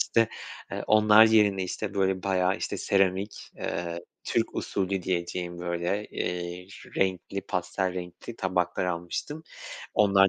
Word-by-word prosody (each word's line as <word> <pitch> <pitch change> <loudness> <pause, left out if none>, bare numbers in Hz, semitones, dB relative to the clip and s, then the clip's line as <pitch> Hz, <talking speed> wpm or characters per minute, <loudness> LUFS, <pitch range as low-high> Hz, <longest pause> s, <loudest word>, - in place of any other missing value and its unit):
işte, 115 -1 +3 0.4
eee, - - -3
onlar 110 0 +7
yerine, 105 -3 +4
işte, 100 +2 -4
böyle 95 -1 +1
bayağı, 95 -1 +2
işte, - - -2
seramik, 95 +1 +1
eee, 85 -1 -3 0.2
Türk - - 0
usulü 95 -1 -1
diyeceğim 85 0 -2
böyle, 85 +4 -1
eee, 90 0 -3 0.3
renkli 95 +1 0
pastel 95 0 -1
renkli 90 +5 -7
tabaklar 90 -2 0
almıştım. 90 - -3 0.5
Onlar 100 -2 +6
95 Hz, 125 wpm, -28 LUFS, 90-100 Hz, 0.5 s, onlar